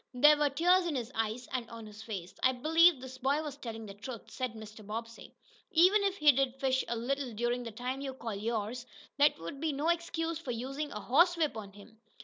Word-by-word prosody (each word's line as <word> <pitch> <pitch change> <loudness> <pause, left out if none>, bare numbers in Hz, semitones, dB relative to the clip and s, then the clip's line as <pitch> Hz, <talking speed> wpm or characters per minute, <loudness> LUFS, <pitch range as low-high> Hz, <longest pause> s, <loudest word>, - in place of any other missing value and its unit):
There 295 +4 +7
were 295 -1 +2
tears 350 +5 +3
in 315 - -2
his 245 -1 -3
eyes, 225 +2 -2
and 240 -3 -3
on 230 -1 -9
his 210 0 -11
face. 195 -6 -6
"I 260 - +4
believe 325 +4 +5
this 260 0 -9
boy 280 +4 +1
was 295 -3 -5
telling 225 -5 -7
the 200 - -8
truth," 220 +3 -9
said 255 -3 -3
Mr. 215 0 -10
Bobbsey. 230 +2 -7 0.3
"Even 370 +5 +5
if 395 -1 0
he 300 -3 +7
did 270 -1 0
fish 260 -1 +1
a 235 - -1
little 255 +2 -2
during 240 +3 -1
the 235 -2 -6
time 250 +5 -4
you 270 -2 -5
call 230 -4 -5
yours, 225 +3 -3 0.3
that 290 +1 +4
would 170 - -7
be 320 -1 +1
no 295 +4 0
excuse 335 -1 -1
for 330 - -9
using 270 +5 -3
a 210 - -5
horsewhip 330 - +3
on 205 -3 -7
him." 215 +2 -16
255 Hz, 220 wpm, -31 LUFS, 225-295 Hz, 0.3 s, There